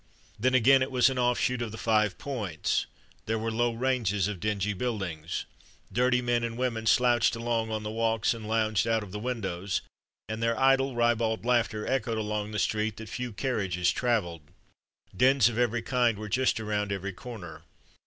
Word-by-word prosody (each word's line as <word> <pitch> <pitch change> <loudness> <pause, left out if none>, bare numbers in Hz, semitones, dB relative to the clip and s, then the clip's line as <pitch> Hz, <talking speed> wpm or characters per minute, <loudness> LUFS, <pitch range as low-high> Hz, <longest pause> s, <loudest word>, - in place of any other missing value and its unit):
Then, 130 +3 +2
again, 130 +2 +6
it 130 - 0
was 130 +1 +4
an 130 - -2
offshoot 125 0 +1
of 115 -2 -3
the 110 - -7
Five 110 -4 +1
Points. 105 - -2 0.4
There 110 +1 0
were 115 +1 -2
low 120 +1 +1
ranges 115 -6 0
of 105 -3 -4
dingy 105 +1 -1
buildings. 90 -8 -3 0.5
Dirty 125 +1 +2
men 120 -1 +1
and 115 0 -3
women 115 -3 -1
slouched 120 0 +4
along 115 -1 -1
on 110 -1 -3
the 105 - -4
walks 115 0 +1
and 110 -2 -8
lounged 110 0 +1
out 115 -1 +1
of 100 - -10
the 105 - -5
windows, 100 -6 -2 0.5
and 110 +1 -4
their 115 0 +1
idle, 135 0 +3
ribald 115 -1 +1
laughter 115 -3 +1
echoed 115 -4 -1
along 105 -1 -2
the 105 - -4
street 105 +1 0
that 110 -1 -8
few 125 -1 -4
carriages 100 -5 0
travelled. 105 -10 -1 0.7
Dens 130 +3 +5
of 120 0 -4
every 120 -1 +1
kind 120 -4 +1
were 105 0 -6
just 130 +2 +1
around 105 -2 -2
every 100 0 -3
corner. 100 -8 -9
115 Hz, 180 wpm, -28 LUFS, 105-125 Hz, 0.7 s, again